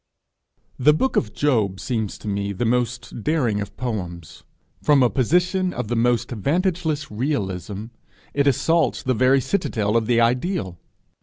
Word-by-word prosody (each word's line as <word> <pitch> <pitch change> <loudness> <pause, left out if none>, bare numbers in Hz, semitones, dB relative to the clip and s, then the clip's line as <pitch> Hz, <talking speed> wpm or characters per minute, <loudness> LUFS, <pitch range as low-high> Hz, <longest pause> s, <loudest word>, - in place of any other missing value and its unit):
The 150 +4 +5
book 260 +10 0
of 105 - +1
Job 110 -10 +1
seems 110 -5 -3
to - - -10
me 100 0 -2
the 110 +5 -2
most 120 -1 -1
daring 125 -10 +1
of 100 - -7
poems: 90 -10 -5 0.4
from 145 -3 +4
a 120 - +3
position 180 - +1
of 110 - -4
the 120 - 0
most 120 +1 +1
vantageless 160 - -1
realism, 105 - -3 0.5
it 140 0 +2
assaults 165 +5 +2
the 130 - +1
very 130 +3 +4
citadel 115 - -1
of 115 -2 +2
the 120 -1 +3
ideal! 120 - 0
120 Hz, 150 wpm, -22 LUFS, 105-150 Hz, 0.5 s, The